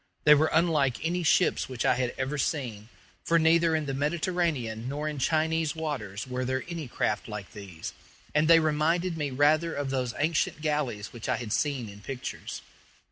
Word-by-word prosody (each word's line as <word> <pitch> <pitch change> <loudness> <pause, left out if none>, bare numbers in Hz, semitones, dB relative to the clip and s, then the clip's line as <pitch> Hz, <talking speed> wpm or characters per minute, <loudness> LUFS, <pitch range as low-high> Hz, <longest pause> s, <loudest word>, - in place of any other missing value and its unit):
They 150 - +8
were 155 +2 +4
unlike 155 -6 +2
any 175 +2 0
ships 175 -1 +2
which 130 -2 -3
I - - +5
had 125 -1 -1
ever 135 +3 -2
seen; 120 -8 -2 0.3
for 170 - +3
neither 165 0 +4
in 155 -1 -1
the 135 - -3
Mediterranean 145 -6 -1
nor 150 +2 -3
in 150 -2 -3
Chinese 160 +2 +1
waters 130 -11 -4
were 125 0 -3
there 130 +1 -1
any 170 -5 -5
craft - - -1
like 105 -2 -7
these, 95 -6 -8 0.4
and 155 +1 +3
they 165 0 +8
reminded 165 +3 +1
me 150 -3 -2
rather 150 +5 +2
of 140 -1 -2
those 125 -3 -1
ancient 155 0 0
galleys 150 -9 -2
which 120 -2 -6
I - - +3
had 115 -2 -4
seen 135 -5 0
in 100 0 -11
pictures. 130 +3 -6
145 Hz, 185 wpm, -28 LUFS, 125-160 Hz, 0.4 s, They